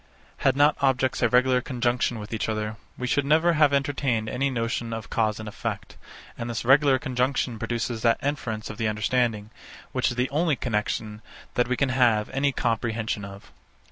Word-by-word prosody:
Had 135 -1 +2
not 145 +2 +4
objects 130 -1 +1
a 120 - +3
regular 125 +1 +3
conjunction 120 -1 -1
with 105 +1 -7
each 110 - -2
other, 110 0 -2 0.2
we 125 - -3
should 140 +3 +1
never 160 +4 +3
have 150 -2 +4
entertained 135 -5 0
any 135 +4 0
notion 115 -2 -2
of 115 0 -6
cause 110 -2 0
and 110 - -7
effect; 105 - -5 0.4
and 115 - -5
this 115 -1 -3
regular 135 +1 +5
conjunction 125 -3 -1
produces 115 0 -2
that 115 -1 +3
inference 120 -7 -3
of 110 - -11
the 110 - +1
understanding, 110 0 0 0.4
which 130 0 +1
is 120 - -4
the 125 +2 0
only 155 +1 +2
connexion, 105 -2 -2 0.3
that 120 - +1
we 125 0 -1
can 140 - +1
have 120 -5 +2
any 140 +1 +1
comprehension 115 -3 -1
of. 100 0 -10
120 Hz, 180 wpm, -25 LUFS, 110-135 Hz, 0.4 s, regular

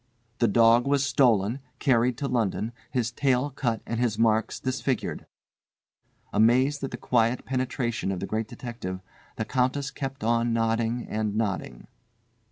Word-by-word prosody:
"The 120 - +4
dog 115 +3 +5
was 140 0 +2
stolen, 120 -4 +3 0.2
carried 125 -3 +2
to 140 - -2
London, 115 -3 -1 0.2
his 120 -3 -1
tail 130 +2 +1
cut 120 -4 -2
and 115 - -3
his 120 -3 0
marks 110 -1 +2
disfigured." 130 0 -2 1.1
Amazed 130 +6 +3
at 135 - -2
the - - -6
quiet 120 0 +1
penetration 125 -5 -1
of 95 - -3
the 100 - -3
Great 110 +2 -2
Detective, 105 -7 -6 0.3
the 110 - -3
Countess 130 +3 0
kept 135 -4 -5
on 115 +1 +2
nodding 115 +1 0
and 105 -1 -2
nodding. 105 -4 -2
120 Hz, 145 wpm, -26 LUFS, 110-130 Hz, 1.1 s, dog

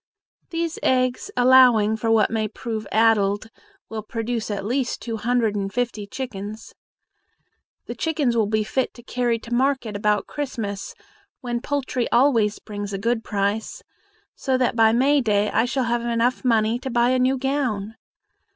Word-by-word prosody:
These 335 -1 -3
eggs, 255 +6 +1
allowing 245 -4 +6
for 225 +1 -2
what 220 -2 +3
may 220 -1 0
prove 220 -1 -5
addled, 215 -1 +2 0.4
will 220 -1 -5
produce 225 +1 -3
at 200 -1 -3
least 250 +2 -1
two 230 -2 -4
hundred 230 -1 +1
and 195 -1 -2
fifty 235 -4 -2
chickens. 215 -3 -7 1.1
The - - -5
chickens 295 -7 0
will 220 -3 +2
be 215 0 +1
fit 260 +4 -2
to 240 - -13
carry 240 -1 0
to 230 +1 -8
market 260 -4 0
about 210 0 +1
Christmas, 225 -9 -5 0.5
when 240 -2 -3
poultry 275 -3 -2
always 235 -4 +3
brings 205 -1 -6
a - - -1
good 230 +3 -1
price, 205 +1 -2 0.5
so 260 -2 -1
that 250 -2 +1
by 225 -1 +5
May 275 +5 +3
day 210 -3 +1
I 225 - +2
shall 265 +1 -1
have 240 0 0 0.4
money 225 -3 +2
enough 245 - -3
to 265 - -4
buy 240 0 +2
a 255 - +2
new 260 +1 +2
gown. 250 -6 -2
230 Hz, 160 wpm, -23 LUFS, 215-255 Hz, 1.1 s, allowing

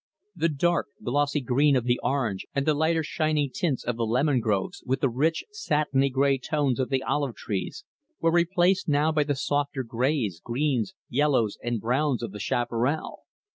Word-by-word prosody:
The 165 - +1
dark, 170 +4 +1 0.2
glossy 145 +3 +1
green 135 +3 +3
of 125 - +1
the 120 0 +1
orange 115 -9 -1
and 140 0 0
the 155 - +3
lighter 160 +2 +1
shining 155 -3 0
tints 150 -8 -1
of 120 -2 -2
the 115 - 0
lemon 130 +4 +2
groves, 105 -4 -1
with 130 +1 -1
the 135 - +3
rich, 150 +7 0
satiny 150 - +1
gray 135 +1 +2
tones 140 -1 0
of 130 - 0
the 135 -1 0
olive 140 -4 -1
trees, 105 - -4 0.3
were 165 - +2
replaced 175 +2 +2
now 150 +2 +3
by 155 -1 +2
the 145 -1 0
softer 145 0 -1
grays, 115 - -1
greens, 135 +6 -1
yellows, 130 -5 +1
and 120 -1 -1
browns 125 +2 0
of - - -4
the 105 - -8
chaparral. 120 +7 -1
140 Hz, 175 wpm, -26 LUFS, 120-150 Hz, 0.3 s, green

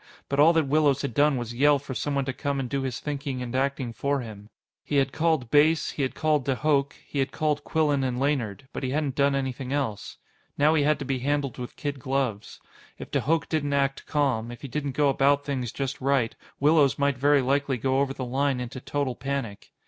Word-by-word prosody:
But 140 - -1
all 155 +3 +7
that 160 -2 +2
Willows 145 -1 +2
had 140 - -3
done 145 +1 +3
was 120 -1 -4
yell 145 +4 +4
for 140 -1 -7
someone 140 +1 -1
to 130 - -2
come 140 +1 -2
and 130 - -2
do 135 +2 -2
his 130 -3 -3
thinking 140 -3 -4
and 125 0 -5
acting 135 -2 -1
for 140 +2 -1
him. 105 -3 -10 0.3
He 145 - -3
had 135 -1 +3
called 160 -7 0
Base; 155 +2 +4
he - - -4
had 130 - -1
called 155 -3 +1
de 135 0 0
Hooch; 140 0 +1
he 140 - -4
had 135 0 0
called 150 0 -1
Quillan 150 -4 +1
and 125 -1 -1
Laynard. 130 -5 -1
But - - -4
he 130 - -2
hadn't 145 0 -1
done 140 0 +2
anything 130 -1 -3
else. 135 -8 -3 0.4
Now 150 +2 +4
he 160 - +3
had 150 +1 +3
to 140 - -6
be 130 -1 -1
handled 140 -1 -1
with 125 - -7
kid 145 -2 -4
gloves. 130 -5 -2 0.4
If - - -9
de - - +1
Hooch 160 +1 +1
didn't 145 -3 -1
act 135 -1 0
calm, 130 -6 0
if 120 +3 -10
he - - -4
didn't 140 0 -3
go 145 +2 +2
about 140 +1 +3
things 130 -5 -2
just 135 -1 -4
right, 135 -4 +1 0.2
Willows 145 -1 +4
might 140 -2 +1
very 145 0 +4
likely 140 0 +1
go 130 +3 +1
over 140 -1 +1
the 130 - -4
line 135 +1 0
into 125 +1 -5
total 140 -2 -2
panic. 125 -4 -5
140 Hz, 225 wpm, -26 LUFS, 130-145 Hz, 0.4 s, all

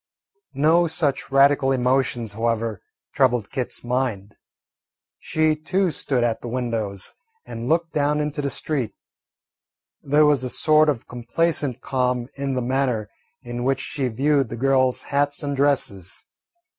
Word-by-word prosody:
No 160 +5 +4
such 155 -4 -1
radical 135 0 +4
emotions, 125 -3 0
however, 115 -1 -1 0.3
troubled 125 -6 +1
Kit's 130 -3 -3
mind. 120 -5 -2 0.9
She 155 0 +1
too 180 +4 0
stood 130 -5 -1
at 115 -2 0
the - - -7
windows 115 -5 -3 0.3
and 115 +2 -6
looked 165 +1 +1
down 150 0 +1
into 150 -1 -2
the 140 - -1
street. 135 -6 -2 1.1
There 150 +2 +3
was 145 -4 +3
a 125 - -2
sort 155 +3 +4
of 130 -6 -2
complacent 130 +1 -1
calm 125 -2 -1
in 140 -1 -2
the 125 - -1
manner 125 -4 -1 0.3
in 120 0 -5
which 135 +1 +1
she 135 -3 -2
viewed 135 +2 +1
the 115 - -6
girls' 130 0 +2
hats 145 +1 0
and 140 -1 -2
dresses. 120 -9 0
135 Hz, 140 wpm, -23 LUFS, 120-145 Hz, 1.1 s, No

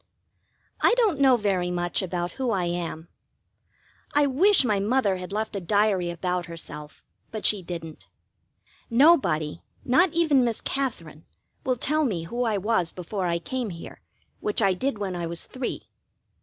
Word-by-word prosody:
I 485 - +5
don't 420 - +2
know 265 -3 +6
very 190 -5 0
much 175 -1 -1
about 175 -2 -3
who 260 +4 -2
I 195 -5 +1
am. 170 -1 -3 1.1
I 295 0 +5
wish 315 +5 +4
my 210 -4 +2
Mother 205 -2 +1
had 180 +1 -7
left 215 +1 -2
a - - -1
diary 200 -1 +2
about 180 +1 -2
herself, 155 -3 -8 0.3
but 215 -2 -5
she 205 -2 +3
didn't. 165 -3 -8 0.8
Nobody, 230 - +3 0.2
not 330 +8 +4
even 310 -6 +4
Miss 235 -2 0
Katherine, 170 - -3 0.4
will 255 - +1
tell 305 +6 0
me 190 - -1
who 240 +9 -2
I 220 -3 +1
was 190 -4 0
before 185 +1 -4
I 170 0 +1
came 255 +4 -3
here, 170 -2 -9 0.4
which 420 -8 0
I 195 -4 +3
did 245 +6 -2
when 195 -3 -3
I 170 -1 -3
was 170 0 -4
three. 255 -1 -5
200 Hz, 160 wpm, -26 LUFS, 175-255 Hz, 1.1 s, know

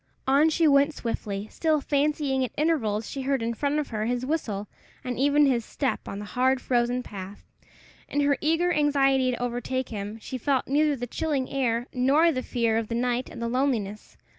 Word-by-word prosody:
On 280 +4 +4
she 320 +1 +3
went 285 +1 +4
swiftly, 210 -3 -4
still 315 -2 +1
fancying 285 -2 0
at 255 - -1
intervals 230 -10 0
she 275 - -5
heard 270 -2 0
in 230 +1 -1
front 285 +5 -1
of 300 - -2
her 215 -1 -2
his 245 +1 -1
whistle, 220 -9 -2 0.4
and 250 -1 -4
even 290 +2 +4
his 250 -4 +2
step 270 +4 -3
on 195 - -5
the 210 - -6
hard, 260 +4 +1
frozen 245 0 0
path. 200 -2 -9 0.6
In 290 - 0
her 285 0 +3
eager 330 +3 +2
anxiety 275 -3 +3
to 245 - -2
overtake 245 +1 -2
him, 210 0 -5
she 255 +3 -6
felt 270 +1 +1
neither 295 +2 +2
the 245 -2 -4
chilling 275 +1 -2
air 240 -3 0
nor 280 +7 +4
the 255 -4 -2
fear 230 -3 0
of 225 - -4
the 230 - -3
night 245 +1 -1
and - - -9
the 235 - -2
loneliness. 230 -5 -2
260 Hz, 195 wpm, -26 LUFS, 235-285 Hz, 0.6 s, On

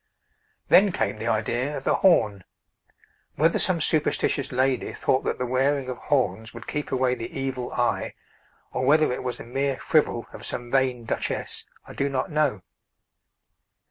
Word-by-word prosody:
Then 200 +1 +6
came 110 - -2
the 110 - -3
idea 120 +6 0
of - - -7
the - - +2
horn. 105 - +3 0.9
Whether 165 +3 +3
some 185 -3 +3
superstitious 150 -3 +1
lady 130 0 0
thought 130 - +1
that - - -1
the 125 - -2
wearing 135 +2 +1
of 125 - -5
horns 120 -5 -1
would 115 - -9
keep 150 0 -4
away 130 -1 +2
the 120 +2 -5
evil 130 -2 -3
eye, 120 -1 -1 0.6
or - - -2
whether 155 -2 +4
it - - -4
was 125 -1 -3
a - - -7
mere 135 +2 -1
frivol 150 -7 +1
of - - -10
some 120 0 -3
vain 130 -3 +1
Duchess, - - -3 0.2
I - - -11
do 140 - -1
not 135 +1 -2
know. 145 -11 +1
130 Hz, 165 wpm, -25 LUFS, 120-145 Hz, 0.9 s, Then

